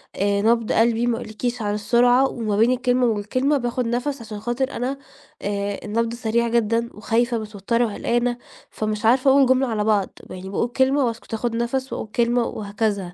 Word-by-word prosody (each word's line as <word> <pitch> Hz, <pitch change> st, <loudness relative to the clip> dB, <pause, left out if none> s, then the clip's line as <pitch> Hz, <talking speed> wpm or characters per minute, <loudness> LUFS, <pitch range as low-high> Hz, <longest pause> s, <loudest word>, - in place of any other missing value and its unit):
آآ، 200 Hz, +1 st, +1 dB
نبض 230 Hz, +1 st, +2 dB
قلبي 230 Hz, +1 st, +2 dB
ما 235 Hz, -, +1 dB
اقولكيش 235 Hz, +1 st, -4 dB
على 205 Hz, 0 st, -1 dB
السرعة، 245 Hz, +5 st, +3 dB
وما 215 Hz, -4 st, -2 dB
بين 230 Hz, +4 st, +4 dB
الكلمة 250 Hz, 0 st, +2 dB
والكلمة 240 Hz, +7 st, +1 dB
باخُد 245 Hz, -1 st, -2 dB
نَفَس 250 Hz, +3 st, -2 dB
عشان 215 Hz, -2 st, -7 dB
خاطر 240 Hz, +4 st, -2 dB
أنا 255 Hz, +3 st, -3 dB, 0.4 s
آآ، 200 Hz, 0 st, -2 dB
النبض 230 Hz, +2 st, -1 dB
سريع 235 Hz, 0 st, 0 dB
جدًا 230 Hz, 0 st, +1 dB
وخايفة 230 Hz, +3 st, 0 dB
متوترة 215 Hz, +2 st, -1 dB
وقلقانة، 240 Hz, +3 st, -1 dB, 0.3 s
فمش 215 Hz, 0 st, -3 dB
عارفة 260 Hz, +3 st, +5 dB
اقول 275 Hz, 0 st, +6 dB
جملة 260 Hz, +1 st, +3 dB
على 215 Hz, -3 st, -1 dB
بعض، 210 Hz, -3 st, +2 dB, 0.2 s
م -, -, -8 dB
يعني 185 Hz, +1 st, -8 dB
باقول 215 Hz, +4 st, 0 dB
كلمة 265 Hz, +2 st, +2 dB
واسكت 230 Hz, -1 st, -5 dB
اخُد 230 Hz, +1 st, -2 dB
نَفَس 260 Hz, +3 st, -2 dB
واقول -, -, -4 dB
كلمة 240 Hz, 0 st, +2 dB
وهكذا. 205 Hz, -4 st, -3 dB
235 Hz, 180 wpm, -22 LUFS, 215-245 Hz, 0.4 s, اقول